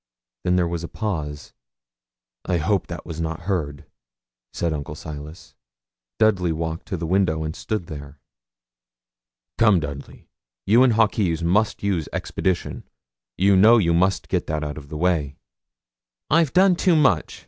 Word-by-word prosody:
Then 90 Hz, -, +2 dB
there 90 Hz, -1 st, +2 dB
was 85 Hz, 0 st, -4 dB
a -, -, -4 dB
pause. 80 Hz, -10 st, -5 dB, 0.9 s
'I 90 Hz, -, +1 dB
hope 95 Hz, +4 st, 0 dB
that 85 Hz, -, -7 dB
was 85 Hz, -1 st, -6 dB
not 80 Hz, +1 st, -3 dB
heard,' 80 Hz, -7 st, -3 dB, 0.7 s
said 85 Hz, -2 st, -2 dB
Uncle 75 Hz, 0 st, -5 dB
Silas. 75 Hz, +2 st, -9 dB, 0.6 s
Dudley 100 Hz, -6 st, +2 dB
walked 80 Hz, 0 st, -4 dB
to 95 Hz, -, -3 dB
the 85 Hz, -, -4 dB
window 80 Hz, -3 st, +1 dB
and 80 Hz, +1 st, -4 dB
stood 110 Hz, -6 st, -3 dB
there. 75 Hz, -3 st, -9 dB, 1.4 s
'Come, 105 Hz, -5 st, +5 dB
Dudley, 70 Hz, -2 st, -8 dB, 0.4 s
you 115 Hz, +5 st, +5 dB
and 130 Hz, -3 st, +5 dB
Hawkes 100 Hz, -7 st, +1 dB
must 100 Hz, +7 st, +1 dB
use 95 Hz, -6 st, -1 dB
expedition. 90 Hz, -2 st, -2 dB, 0.5 s
You 100 Hz, +1 st, +4 dB
know 110 Hz, +5 st, +7 dB
you 85 Hz, -6 st, +2 dB
must 90 Hz, +2 st, +1 dB
get -, -, -1 dB
that 75 Hz, 0 st, -2 dB
out 75 Hz, 0 st, -5 dB
of 70 Hz, -1 st, -15 dB
the 75 Hz, -, -6 dB
way.' 80 Hz, -5 st, 0 dB, 1.0 s
'I've 160 Hz, -3 st, +3 dB
done 185 Hz, 0 st, +5 dB
too 175 Hz, 0 st, +2 dB
much. 135 Hz, -, +2 dB
85 Hz, 150 wpm, -23 LUFS, 80-100 Hz, 1.4 s, know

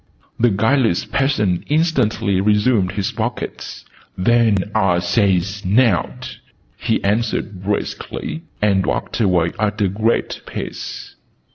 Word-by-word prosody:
The 120 Hz, -, +4 dB
guileless 110 Hz, -1 st, +2 dB
peasant 105 Hz, -10 st, 0 dB
instantly 120 Hz, -, +1 dB
resumed 105 Hz, -2 st, +2 dB
his 100 Hz, -1 st, -2 dB
buckets. -, -, -5 dB, 0.3 s
"Then 110 Hz, -1 st, +2 dB
ah 90 Hz, -2 st, +2 dB
says 95 Hz, +1 st, +1 dB
nowt!" 110 Hz, +6 st, +1 dB, 0.4 s
he -, -, -1 dB
answered 105 Hz, -2 st, -1 dB
briskly, 105 Hz, +9 st, -3 dB, 0.2 s
and 100 Hz, -2 st, +3 dB
walked -, -, -2 dB
away 90 Hz, -5 st, +2 dB
at 105 Hz, 0 st, 0 dB
a 100 Hz, -, +3 dB
great 110 Hz, +4 st, -1 dB
pace. -, -, -6 dB
105 Hz, 110 wpm, -19 LUFS, 95-115 Hz, 0.4 s, The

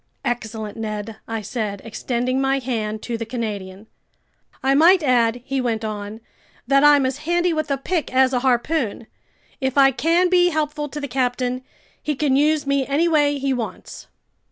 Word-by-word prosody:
"Excellent, 220 Hz, -3 st, -4 dB
Ned," 215 Hz, 0 st, -5 dB
I 225 Hz, -1 st, -3 dB
said, 210 Hz, -2 st, -3 dB
extending 250 Hz, +3 st, -2 dB
my 270 Hz, 0 st, +2 dB
hand 220 Hz, -5 st, -3 dB
to 235 Hz, -2 st, -4 dB
the -, -, -2 dB
Canadian. 210 Hz, -4 st, -5 dB, 0.8 s
"I 270 Hz, +1 st, +3 dB
might 335 Hz, +5 st, +5 dB
add," 245 Hz, -3 st, +2 dB
he 270 Hz, -1 st, -1 dB
went 225 Hz, -3 st, -1 dB
on, 210 Hz, +1 st, -6 dB, 0.4 s
"that 275 Hz, +3 st, +3 dB
I'm 290 Hz, -2 st, +6 dB
as 260 Hz, +2 st, -2 dB
handy 345 Hz, +2 st, +1 dB
with 310 Hz, -1 st, -2 dB
a 275 Hz, -, +1 dB
pick 315 Hz, +2 st, -2 dB
as 260 Hz, 0 st, +3 dB
a 250 Hz, -, +2 dB
harpoon. 245 Hz, -2 st, 0 dB, 0.5 s
If 265 Hz, -1 st, -2 dB
I 270 Hz, -1 st, +7 dB
can 335 Hz, +7 st, +2 dB
be 355 Hz, 0 st, +4 dB
helpful 300 Hz, -2 st, -2 dB
to 295 Hz, -, -6 dB
the 285 Hz, -, -4 dB
captain, 250 Hz, -1 st, -1 dB, 0.4 s
he 300 Hz, -, -2 dB
can 275 Hz, -1 st, +1 dB
use 300 Hz, +1 st, +2 dB
me 280 Hz, -1 st, +1 dB
any 295 Hz, +5 st, +2 dB
way 290 Hz, -3 st, +2 dB
he 275 Hz, -1 st, 0 dB
wants." 235 Hz, -4 st, -6 dB
260 Hz, 175 wpm, -21 LUFS, 230-295 Hz, 0.8 s, I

